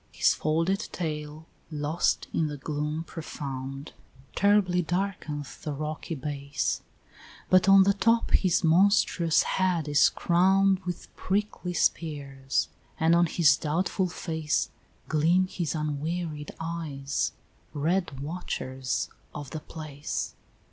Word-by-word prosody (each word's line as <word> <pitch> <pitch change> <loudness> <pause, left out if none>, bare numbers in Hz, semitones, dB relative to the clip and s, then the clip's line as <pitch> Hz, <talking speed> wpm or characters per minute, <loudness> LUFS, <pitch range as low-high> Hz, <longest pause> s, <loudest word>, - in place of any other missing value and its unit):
His - - +3
folded 165 +6 +1
tail, 150 -2 -4 0.2
lost 150 +2 0
in 160 - +1
the 150 -1 -5
gloom 150 +2 -3
profound, 135 -4 -6 0.4
Terribly 200 -3 +3
darkeneth 165 -5 -3
the 150 - -3
rocky 155 +3 -4
base; 140 0 -2 0.7
But 185 +1 +6
on 195 0 +9
the 200 +1 +4
top 230 +3 +2
his 185 -1 +3
monstrous 170 -1 +4
head 180 -5 0
is 145 -1 +5
crown'd 190 +2 +3
With 180 -1 -6
prickly 190 -2 -2
spears, 140 -6 0 0.3
and 160 +1 +4
on 170 0 +5
his 150 -3 +5
doubtful 180 +5 0
face 160 -3 -1 0.4
Gleam 165 +5 +3
his 175 -3 -3
unwearied 155 0 -3
eyes, 160 -5 -2 0.4
red 155 -1 -1
watchers 130 -5 -3 0.3
of 145 -3 -7
the 155 - -4
place. 150 -2 -5
160 Hz, 115 wpm, -27 LUFS, 150-180 Hz, 0.7 s, on